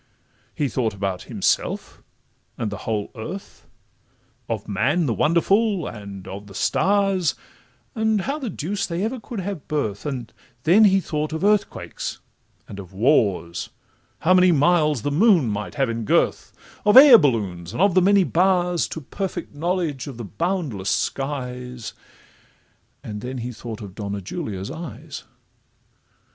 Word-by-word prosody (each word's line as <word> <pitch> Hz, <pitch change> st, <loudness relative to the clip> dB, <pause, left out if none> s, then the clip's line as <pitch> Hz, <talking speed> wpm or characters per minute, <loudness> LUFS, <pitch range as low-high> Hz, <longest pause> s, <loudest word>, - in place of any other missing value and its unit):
He 145 Hz, -, 0 dB
thought 115 Hz, -4 st, -1 dB
about 95 Hz, -2 st, -3 dB
himself, -, -, -1 dB, 0.6 s
and 110 Hz, -3 st, -2 dB
the 105 Hz, -, -8 dB
whole 105 Hz, -2 st, -2 dB
earth 160 Hz, -, -8 dB, 0.8 s
Of -, -, -3 dB
man 130 Hz, -, +1 dB
the 120 Hz, -, +1 dB
wonderful, 185 Hz, -, +2 dB
and 100 Hz, -3 st, -8 dB
of 100 Hz, +2 st, -8 dB
the 95 Hz, -, -13 dB
stars, 195 Hz, -, +2 dB, 0.6 s
And 220 Hz, -2 st, +1 dB
how 280 Hz, +8 st, -3 dB
the 260 Hz, -6 st, -4 dB
deuce 190 Hz, +3 st, -3 dB
they 175 Hz, +2 st, -2 dB
ever 240 Hz, +4 st, -2 dB
could 225 Hz, -2 st, -6 dB
have 190 Hz, -4 st, -5 dB
birth; 125 Hz, -6 st, -2 dB
And 125 Hz, -5 st, -5 dB, 0.3 s
then 200 Hz, +7 st, +6 dB
he 195 Hz, -1 st, +4 dB
thought 155 Hz, -2 st, -3 dB
of 160 Hz, -, -3 dB
earthquakes, 210 Hz, 0 st, 0 dB, 0.5 s
and 100 Hz, -, -9 dB
of 95 Hz, -1 st, -10 dB
wars, 95 Hz, -, +1 dB, 0.5 s
How 185 Hz, -, +4 dB
many 185 Hz, 0 st, +6 dB
miles 150 Hz, -4 st, +3 dB
the 145 Hz, -, -1 dB
moon 175 Hz, -, +4 dB
might 105 Hz, 0 st, -4 dB
have 135 Hz, -2 st, +1 dB
in 115 Hz, 0 st, -3 dB
girth, 105 Hz, -, +1 dB, 0.3 s
Of 210 Hz, +3 st, +6 dB
air 265 Hz, -4 st, +11 dB
balloons, 95 Hz, -, -1 dB
and 120 Hz, -, -6 dB
of 195 Hz, 0 st, +4 dB
the 185 Hz, -, +5 dB
many 200 Hz, +1 st, +5 dB
bars 180 Hz, -1 st, +2 dB
To 160 Hz, -, -6 dB
perfect 180 Hz, +3 st, -5 dB
knowledge 160 Hz, -4 st, -2 dB
of 135 Hz, -4 st, -7 dB
the 120 Hz, -, -6 dB
boundless 150 Hz, -, -2 dB
skies;— 125 Hz, +2 st, -3 dB, 1.1 s
And 105 Hz, -1 st, -6 dB
then 130 Hz, +2 st, -5 dB
he 125 Hz, +1 st, -4 dB
thought 115 Hz, -1 st, -8 dB
of 100 Hz, -3 st, -8 dB
Donna 100 Hz, -1 st, -4 dB
Julia's 100 Hz, -, -5 dB
eyes. 160 Hz, +2 st, -8 dB
145 Hz, 150 wpm, -23 LUFS, -, 1.1 s, air